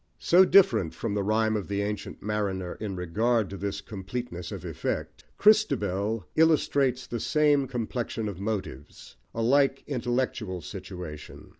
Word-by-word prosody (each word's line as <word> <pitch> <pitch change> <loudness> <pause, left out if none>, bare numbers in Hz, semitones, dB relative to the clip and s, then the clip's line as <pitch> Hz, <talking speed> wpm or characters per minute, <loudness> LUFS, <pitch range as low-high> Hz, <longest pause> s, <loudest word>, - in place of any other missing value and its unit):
So 185 +2 +5
different 190 - +4
from 115 -3 -3
The 100 - 0
Rhyme 110 +2 +1
of 105 -3 -3
the 100 0 -1
Ancient 105 0 -5
Mariner 100 -4 -2
in 105 -3 -4
regard 105 +5 0
to - - -5
this 100 +1 -3
completeness 100 -2 -6
of - - -7
effect, - - -4
Christabel 110 - +2
illustrates 140 -5 +3
the 120 -1 -4
same 145 -1 +2
complexion 120 -2 -3
of 100 -3 -6
motives, 100 -10 -5 0.2
a 115 - -1
like 135 +2 +3
intellectual 120 -7 -2
situation. 90 -5 -8
110 Hz, 140 wpm, -27 LUFS, 95-125 Hz, 0.2 s, So